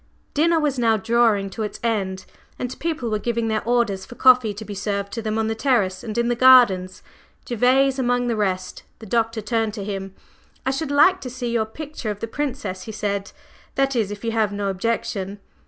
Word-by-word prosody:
Dinner 330 +2 +3
was 290 -4 0
now 225 -2 +3
drawing 220 -2 +2
to 220 - -6
its 210 - -4
end, 195 -5 -1 0.3
and 250 0 -5
people 310 -8 -2
were 215 - 0
giving 235 0 -1
their 220 -1 -1
orders 230 -5 +1
for 240 - -11
coffee 250 -4 +5
to 205 +2 -8
be 205 - -6
served 200 0 -3
to 230 - -3
them 215 0 -2
on 220 - +1
the 220 - 0
terrace 220 -6 +1
and 220 -1 -5
in 235 0 +2
the 240 - +2
gardens, 230 -8 +5 0.4
Gervase 260 +3 +3
among 245 -1 +1
the 235 -2 0
rest. 185 -3 -2 0.2
The 225 - -11
Doctor 225 +1 0
turned 225 0 -1
to 205 - -5
him. 195 -1 -5 0.5
"I 265 - +2
should 275 +2 -3
like 330 +7 +4
to 255 - -5
see 245 -1 -4
your 230 -2 +1
picture 280 0 -7
of 205 -1 -4
the - - -3
Princess," 260 -8 -4
he 220 - -6
said, 200 -2 -3 0.4
"that 270 -1 +1
is 220 -4 +1
if 205 +1 -7
you 230 - -1
have 220 -2 +1
no 200 -1 -2
objection." 195 -1 -2
225 Hz, 210 wpm, -22 LUFS, 205-250 Hz, 0.5 s, coffee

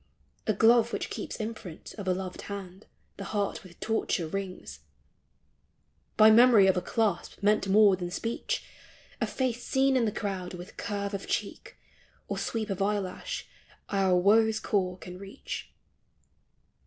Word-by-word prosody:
A 215 - +3
glove 230 +3 +5
which - - -3
keeps - - -5
imprint 215 -6 -7
Of 205 -3 -7
a 185 - +3
loved 185 -1 -5
hand 195 -1 -8 0.3
the 195 - -6
heart 200 0 -2
with 175 -3 -15
torture 220 -5 0
wrings 185 - -6 1.4
By 215 +1 +8
memory 230 -3 +7
of 190 - +4
a 180 - 0
clasp 205 -1 -1
meant 210 -1 +3
more 200 0 +6
than 175 -1 -5
speech; 230 +6 -3 0.6
A - - +1
face 250 -2 -2
seen 270 0 +2
in 245 -3 +3
the 215 - 0
crowd 190 -4 -4
with 180 +3 -10
curve 200 -1 -3
of 195 - -4
cheek - - -4 0.5
Or - - -3
sweep 220 -2 -2
of 195 - -3
eyelash 205 - -2 0.4
our 195 -2 +2
woe's 220 +4 +4
core 185 -4 0
can 180 0 -10
reach. 200 +6 -7
200 Hz, 150 wpm, -29 LUFS, 185-220 Hz, 1.4 s, By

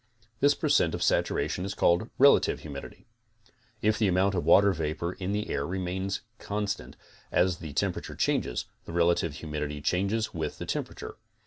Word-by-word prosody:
This 145 +1 +4
per 155 - -2
cent 115 - +3
of - - -2
saturation 90 - +1
is 100 +1 -4
called 85 +7 +2
relative 140 +1 +5
humidity. 70 -3 -9 0.8
If 105 0 +2
the 110 - +3
amount 95 +2 +2
of 90 - -1
water 100 0 +6
vapor 80 +2 -2
in 95 0 -4
the 105 +1 -2
air 70 - 0
remains 95 +3 -3 0.2
constant 105 0 -3 0.3
as 90 -1 +2
the 80 -4 -8
temperature - - -2
changes, - - 0 0.2
the - - -8
relative 85 -2 +2
humidtiy 75 -1 -4
changes 100 +7 0
with - - -3
the - - -5
temperature. - - -5
90 Hz, 160 wpm, -28 LUFS, 85-100 Hz, 0.8 s, water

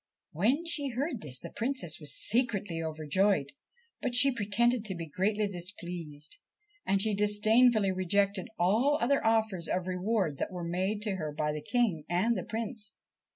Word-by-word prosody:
When 245 - +1
she 295 -4 +2
heard 265 0 -3
this 130 -4 0
the - - -9
Princess 245 - -2
was 150 -3 -4
secretly 210 -8 +1
overjoyed; 155 0 0 0.5
but 255 -3 -2
she 270 +2 +6
pretended 235 +2 +1
to 190 -3 -2
be 170 -1 -5
greatly 205 +7 0
displeased, 175 - -7 0.5
and 195 0 +2
she 215 +1 +2
disdainfully 210 +1 +3
rejected 195 +2 0
all 225 +12 +2
other 275 +4 +1
offers 220 -6 +1
of 180 -1 -1
reward 185 -4 -1
that - - -2
were 180 -1 -5
made 190 +5 -2
to 205 -3 -2
her 155 -4 -4
by 150 0 -2
the 150 - -5
King 200 -8 0
and 190 +7 +1
the - - -3
Prince. 220 -1 -5
200 Hz, 160 wpm, -30 LUFS, 175-230 Hz, 0.5 s, she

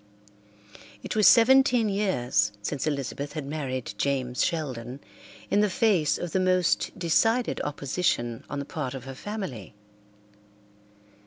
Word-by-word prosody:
It - - -4
was 215 -1 +5
seventeen 255 -1 +5
years 125 - 0
since 145 +7 -2
Elizabeth 140 0 -3
had 150 -2 -5
married 135 -4 -4
James 130 -3 0
Sheldon 130 -6 -3 0.5
in 205 - +3
the 210 0 +3
face 185 -7 +2
of 175 - -5
the 190 - +1
most 185 -1 +1
decided 225 +7 +1
opposition 140 -5 -2
on 145 - -4
the 140 - -4
part 140 -3 -4
of 130 - -7
her 135 +1 -8
family. 135 - -6
150 Hz, 130 wpm, -26 LUFS, 130-195 Hz, 0.5 s, was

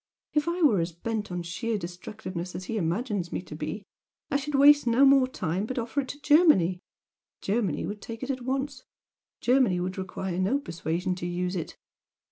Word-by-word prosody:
If 300 +1 +1
I 345 +1 0
were 220 - +5
as 165 +1 -2
bent 215 +3 -4
on 175 -1 -3
sheer 220 +6 -2
destructiveness 180 0 -6
as 180 - -5
he 225 - -4
imagines 195 0 -1
me - - -2
to 150 - -9
be, 155 +7 -5 0.5
I - - 0
should 285 +1 -3
waste 285 -1 +7
no 240 +4 +5
more 270 -1 +6
time, 190 -4 -2
but 260 - -4
offer 245 +4 -1
it 265 - -8
to 285 +3 -8
Germany. 290 - +5 0.6
Germany 200 -5 0
would 205 0 -5
take 230 +2 -7
it 265 - -1
at 260 -1 -4
once 265 +1 -2 0.6
Germany 245 -8 +3
would 185 +2 -3
require 185 -1 -4
no 195 +9 +2
persuasion 170 - -2
to 175 - -4
use 180 +1 -2
it! 170 - -5
210 Hz, 190 wpm, -27 LUFS, 180-265 Hz, 0.6 s, waste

